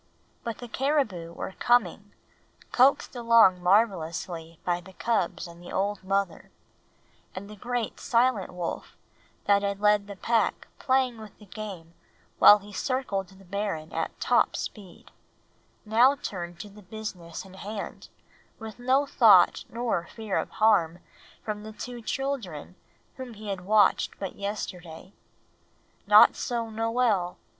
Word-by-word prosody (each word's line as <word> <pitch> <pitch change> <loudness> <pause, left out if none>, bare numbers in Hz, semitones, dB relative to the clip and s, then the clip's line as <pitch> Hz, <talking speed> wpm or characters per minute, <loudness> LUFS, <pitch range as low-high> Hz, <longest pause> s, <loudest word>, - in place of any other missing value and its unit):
But 230 -2 -4
the 245 - -9
caribou 235 - -1
were 170 - -6
coming, 205 -4 +1 0.6
coaxed 260 +1 +3
along 230 -6 +5
marvelously 175 -4 0
by 175 0 0
the 190 +2 -15
cubs 185 -6 -1
and 170 0 -12
the 175 - -10
old 200 0 -1
mother; 195 -2 -2 0.9
and 190 +2 -7
the 210 - -10
great 240 +2 -3
silent 235 -4 +1
wolf, 180 -2 -6 0.5
that 200 0 +4
had 200 0 -2
left 210 -1 +3
the 200 - -8
pack 225 +4 0
playing 255 -3 +1
with 215 -2 -12
the 210 - -16
game 195 -5 -8 0.5
while 205 - +9
he 205 0 -13
circled 205 -6 -2
the 195 0 -18
barren 185 -5 -4
at - - -3
top - - +2
speed, 195 -5 -8 0.7
now 240 +6 +5
turned 175 -8 -6
to 210 - -9
the 205 +1 -15
business 185 -4 -7
in 190 - -14
hand 205 +2 -7 0.5
with 220 0 -9
no 260 +3 +2
thought 215 -9 +5
nor 230 -8 -2
fear 220 -4 -4
of - - -4
harm 195 -7 +2 0.5
from 210 -1 -4
the 215 +1 -9
two 240 +2 -7
children 225 - -4 0.4
whom 255 -3 -8
he 210 0 -8
had 195 -2 -3
watched 205 -1 +3
but 195 -2 -6
yesterday. 190 -3 -6 0.9
Not - - +8
so 235 -3 -3
Noel. 225 -5 0
205 Hz, 140 wpm, -27 LUFS, 185-230 Hz, 0.9 s, while